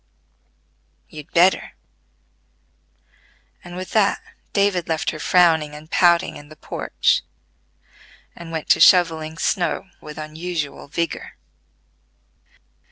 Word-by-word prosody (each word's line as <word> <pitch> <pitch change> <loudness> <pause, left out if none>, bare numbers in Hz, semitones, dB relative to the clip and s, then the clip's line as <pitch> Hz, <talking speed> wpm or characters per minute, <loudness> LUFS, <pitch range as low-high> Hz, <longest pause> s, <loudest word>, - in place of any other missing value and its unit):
"You'd 150 0 -11
better," 180 +3 +3 1.9
and 175 0 -10
with 185 0 -7
that 210 -2 +2 0.3
David 200 -3 +1
left 160 -1 -1
her 155 - -8
frowning 160 -3 +3
and 155 +2 -13
pouting 170 -1 +3
in 145 0 -14
the 155 - -13
porch, - - 0 1.1
and 170 -1 -10
went 160 -2 -4
to - - +5
shovelling 160 -3 +4
snow 190 +1 -1
with 150 0 -10
unusual 155 -1 -5
vigor. 165 +3 -4
165 Hz, 100 wpm, -21 LUFS, 155-180 Hz, 1.9 s, to